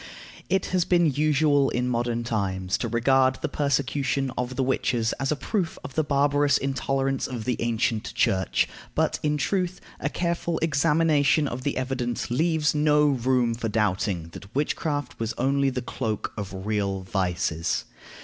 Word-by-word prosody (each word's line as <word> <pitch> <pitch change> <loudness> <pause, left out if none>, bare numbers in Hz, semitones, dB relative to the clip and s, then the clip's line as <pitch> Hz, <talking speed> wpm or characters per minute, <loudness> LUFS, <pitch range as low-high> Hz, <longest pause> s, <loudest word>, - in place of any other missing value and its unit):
It 190 -1 +1
has 180 -2 +3
been 175 -1 +3
usual 145 -1 +3
in 125 +1 -1
modern 120 -1 -1
times 95 -5 -1
to 120 - -1
regard 130 +3 +3
the - - -3
persecution 140 -1 0
of 125 +1 -3
the 135 - +1
witches 120 -3 0
as 135 +1 0
a - - +2
proof 175 +3 -2
of 130 - -7
the 155 - +1
barbarous 145 0 +3
intolerance 135 0 -1
of 120 -4 -5
the 125 - +1
ancient 115 -1 0
Church; 95 -1 +2 0.3
but, - - +1
in 150 0 +1
truth, 185 +3 -1 0.2
a - - -1
careful 170 -1 -1
examination 150 -1 +3
of 130 -1 -4
the 140 +2 -2
evidence 125 -2 -2
leaves 160 +2 +2
no 150 0 +4
room 125 -2 +1
for 115 -1 -3
doubting 100 -5 0
that 100 +6 -12
witchcraft 145 -1 -2
was 115 0 -2
only 140 +2 +2
the 125 -1 -3
cloak 110 -4 -3
of 95 -2 -6
real 100 -3 -1
vices. 90 -4 -1
130 Hz, 160 wpm, -25 LUFS, 115-145 Hz, 0.3 s, no